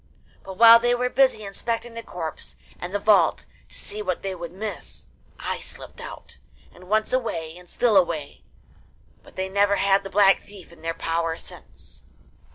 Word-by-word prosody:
But 190 - -8
while 230 +1 +10
they 240 +1 +2
were 250 +1 -1
busy 260 -5 +3
inspecting 230 +4 -4
the 230 - -6
corpse 165 - -6 0.2
and 175 - -6
the 205 - 0
vault 210 0 +3 0.2
to - - -15
see 210 - -6
what 185 -4 -3
they 195 -1 -2
could 170 -2 -7
miss, 210 +4 -7 0.3
I - - -3
slipped - - -10
out, - - -9 0.3
and, 180 - -15
once 215 +3 +1
away, 165 -11 -2
and 180 0 -15
still 235 -4 +2
away; 170 -6 +1 0.8
but - - -18
they 190 0 -2
never 200 +1 +2
had 195 0 +3
the 195 - -7
Black 195 0 +5
Thief 195 -4 -14
in 170 -2 -17
their 165 0 -3
power 165 0 -1
since. - - -13
195 Hz, 175 wpm, -24 LUFS, 175-220 Hz, 0.8 s, while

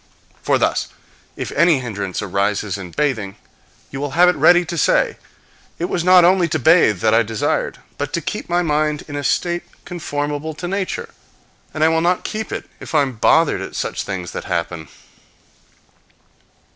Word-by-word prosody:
For - - +2
thus, - - 0 0.5
if - - -5
any 165 -1 +4
hindrance 100 -5 -4
arises 100 +1 -1
in 95 -3 -7
bathing, 110 - -2 0.6
you 135 - -5
will 145 -1 -3
have 180 +1 +7
it 180 - +1
ready 175 +4 +5
to 170 - -5
say, 165 - +2 0.6
"It 175 - -3
was 175 - -1
not 180 -1 +7
only 180 -1 +4
to 155 - -1
bathe 145 - +4
that 110 0 +3
I 115 - +5
desired, 110 -1 -1 0.2
but - - -3
to - - +1
keep - - -5
my 175 +1 +2
mind 150 -1 0
in 145 - -7
a 145 - -3
state 175 +5 0 0.2
conformable 150 -2 -4
to 175 - -5
nature; 195 +1 -3 0.6
and 155 - -1
I 160 - +5
will 160 0 +1
not 175 +2 +1
keep 220 +1 -4
it - - -5
if - - -7
I 150 - +5
am 130 -4 -5
bothered 160 +7 +3
at - - -7
things 90 -2 -4
that - - -6
happen. 85 -2 -3
150 Hz, 175 wpm, -19 LUFS, 110-175 Hz, 0.6 s, have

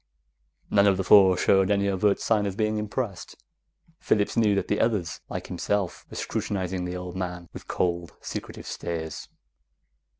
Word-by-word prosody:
None 100 0 +5
of 95 -2 +4
the 95 - -1
four 95 -1 +7
showed 95 +1 +3
any 100 -1 +2
overt 100 +1 +2
sign 105 -3 +1
of 95 0 -5
being 110 -1 0
impressed. 105 -3 -4 0.6
Phillips 105 -1 +1
knew 110 -4 +3
that 100 - -1
the 105 - 0
others, 105 -7 0
like - - -5
himself, 100 -4 -2
were - - -10
scrutinizing 95 -2 -2
the 90 0 -4
old 90 0 -7
man 90 -2 -4
with - - -10
cold, 85 -2 -1
secretive - - -7
stares. 80 -2 -5
95 Hz, 160 wpm, -26 LUFS, 90-105 Hz, 0.6 s, four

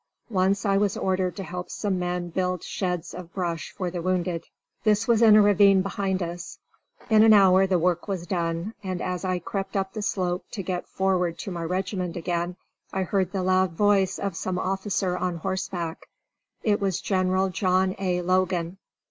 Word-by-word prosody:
Once 195 +1 +1
I 195 -1 +3
was 200 -1 +1
ordered 185 -2 0
to 195 - -5
help 180 0 -6
some 195 -3 -2
men 175 0 -2
build 180 0 -1
sheds 180 -4 -3
of 175 -1 -9
brush 170 -4 -2
for 185 -3 -4
the 175 -1 -4
wounded. 175 -2 -1 0.4
This 215 0 +2
was 235 -2 +4
in 220 -2 +8
a 215 - +7
ravine 200 -2 +5
behind 195 -1 -1
us. 175 +1 -6 0.5
In 215 -1 +7
an 220 0 +7
hour 190 -2 +6
the 185 -1 +2
work 175 +2 0
was 190 -4 -3
done, 170 +3 -2
and 185 -2 -3
as 180 0 -3
I 185 -1 0
crept 195 +3 -4
up 190 0 -2
the 215 - -4
slope 180 -3 -1
to 200 - -4
get 180 0 -3
forward 180 -3 0
to 195 - -6
my 170 -2 -4
regiment 185 0 -2
again 175 +1 -2 0.4
I 190 - -1
heard 185 -1 0
the 190 -2 -2
loud 185 -1 +2
voice 195 0 +2
of 200 -3 -3
some 185 +2 -2
officer 190 -1 -1
on 180 -1 -1
horseback. 175 -1 -4 0.6
It 210 -2 +2
was 195 -3 0
General 185 0 +1
John 185 0 +1
A. 180 -2 0
Logan. 185 0 0
185 Hz, 185 wpm, -25 LUFS, 180-195 Hz, 0.6 s, in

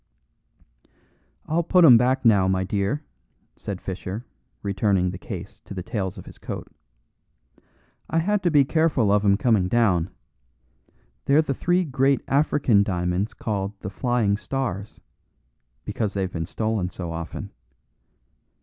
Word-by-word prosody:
"I'll 165 +2 +1
put 175 +1 +5
'em 125 - +9
back 130 +3 +2
now, 100 -5 +5
my 95 0 +1
dear," 100 +9 -1 0.5
said 100 -3 -6
Fischer, 95 +5 -6 0.4
returning 95 -2 +1
the 90 - -8
case 95 -3 -8
to 100 - -8
the 90 - -4
tails 95 -2 -3
of - - -9
his - - -13
coat. - - -6 1.4
"I 165 - 0
had 200 +5 +1
to 175 - +2
be 145 -4 +5
careful 150 -8 +2
of 105 0 +3
'em 100 -1 +4
coming 110 -5 +2
down. 95 -6 +2 1.2
They're 145 +3 +4
the 140 - -1
three 175 +6 +1
great 135 -2 +1
African 135 -6 +3
diamonds 90 +1 -1
called 100 -2 -3
'The 95 - -5
Flying 110 -2 +1
Stars,' 105 -2 -4 0.8
because 105 -3 -2
they've 95 -2 -2
been 80 -1 -3
stolen 110 -5 -1
so 90 -2 -6
often. 80 0 -6
105 Hz, 140 wpm, -24 LUFS, 95-135 Hz, 1.4 s, em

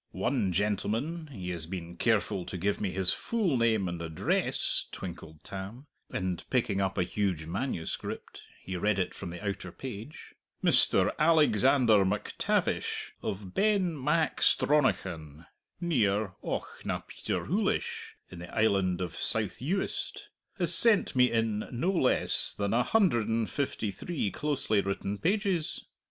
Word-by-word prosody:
One 105 0 +1
gentleman 110 - -1
he 95 -10 -6
has 85 -2 -5
been 85 -1 -6
careful 105 -4 +1
to 90 - -4
give 100 +4 -1
me 100 - 0
his 90 0 +2
full 210 - 0
name 110 -5 +2
and 85 -1 -4
address," 80 -2 0
twinkled 80 -4 -8
Tam, 100 +8 -7 0.3
and 90 -2 -2
picking 110 -6 +1
up 95 -1 -1
a - - +3
huge 90 -4 -1
manuscript 90 -1 -4 0.2
he 95 - -5
read 105 +3 +1
it 90 - -1
from - - -7
the 90 +4 -6
outer 100 0 -4
page, 125 +2 -8 0.3
"Mr. - - +4
Alexander 135 -8 +5
MacTavish 100 +2 -1
of 95 -1 -5
Benmacstronachan, 150 - +1 0.3
near 110 - +1
Auchnapeterhoolish, - - -3 0.2
in 90 - -9
the 85 0 -9
island 95 -4 +2
of 90 - -3
South 110 -4 +4
Uist 185 +9 -2 0.3
has - - +2
sent 220 - +3
me 125 -1 +5
in 115 -2 0
no 150 +10 0
less 165 -9 +2
than 100 0 -1
a 120 - +4
hundred 145 - +2
and 115 -1 0
fifty 130 -7 -2
three 105 - -3
closely 140 -8 0
written 100 +1 -3
pages! 190 -3 0
105 Hz, 130 wpm, -29 LUFS, 95-140 Hz, 0.3 s, Alexander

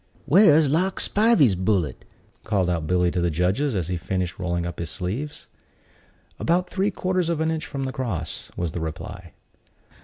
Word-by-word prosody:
"Where's 155 -1 +6
Lark 180 +7 +1
Spivey's 205 - +4
bullet?" 95 -3 -1 0.4
called 95 -5 +1
out 80 -3 -2
Billy 90 0 +2
to 90 - -1
the 85 - +2
judges, 95 - 0
as 90 -4 -1
he 90 0 -2
finished 90 +1 -3
rolling 85 -2 -1
up 85 - -6
his 85 -2 -3
sleeves. 110 - -4 0.9
"About 180 +2 +1
three 195 +2 0
quarters 185 -3 -1
of 165 -2 0
an 160 0 +1
inch 160 -1 -3
from 135 -1 -4
the 130 -1 -3
cross," 90 -12 -4
was 85 -2 -2
the 85 - -4
reply. 85 +3 -7
100 Hz, 175 wpm, -24 LUFS, -, 0.9 s, Where's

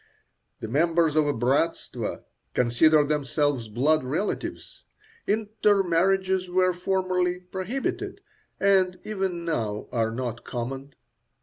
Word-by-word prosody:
The - - -4
members 165 +4 +2
of 155 -1 +3
a - - +3
bratstvo 140 +7 -1 0.3
consider 145 +6 +4
themselves 145 -3 0
blood 140 +8 +2
relatives, 155 +11 -4 0.4
intermarriages 195 -3 +2
were 185 0 +3
formerly 180 0 0
prohibited, 190 +8 -4 0.4
and 190 -2 +3
even 190 -5 -3
now 110 -10 -2
are 115 -2 +1
not 120 0 -4
common. 135 +3 -5
165 Hz, 100 wpm, -26 LUFS, 135-185 Hz, 0.4 s, consider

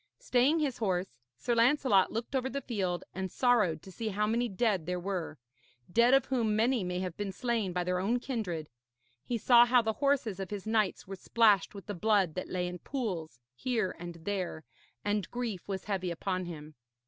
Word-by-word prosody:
Staying 255 +6 +3
his 290 -6 -1
horse, 185 - -1 0.2
Sir 240 - -1
Lancelot 235 -4 +4
looked 230 +5 -4
over 265 0 0
the 280 - -3
field, 190 -7 -2
and 190 +1 -3
sorrowed 210 - +2
to 190 - -11
see 225 +4 -5
how 210 0 0
many 235 +3 0
dead 195 -5 0
there 180 0 -1
were 175 -4 -3 0.6
dead 240 +3 +6
of 270 - +3
whom 230 -5 +1
many 230 0 +2
may 180 0 -2
have 180 -3 -4
been 205 -1 -3
slain 225 -2 -1
by 180 0 -1
their 180 +1 0
own 225 +6 +1
kindred. 200 - -3 0.6
He 240 - -2
saw 240 +1 +7
how 240 0 +4
the 220 0 0
horses 270 -9 +1
of 195 - -4
his 205 -1 -5
knights 220 -3 +1
were 195 - -6
splashed 210 -2 +3
with 200 - -9
the 205 - -4
blood 200 -3 +2
that 185 - -5
lay 180 -1 -1
in 180 0 -6
pools 175 - -4
here 215 - -1
and 175 -1 -7
there, 185 -5 -3 0.4
and 205 -3 0
grief 235 -7 -4
was 195 -2 -3
heavy 190 -3 -1
upon 185 +2 -2
him. 155 -3 -8
205 Hz, 195 wpm, -31 LUFS, 180-235 Hz, 0.6 s, saw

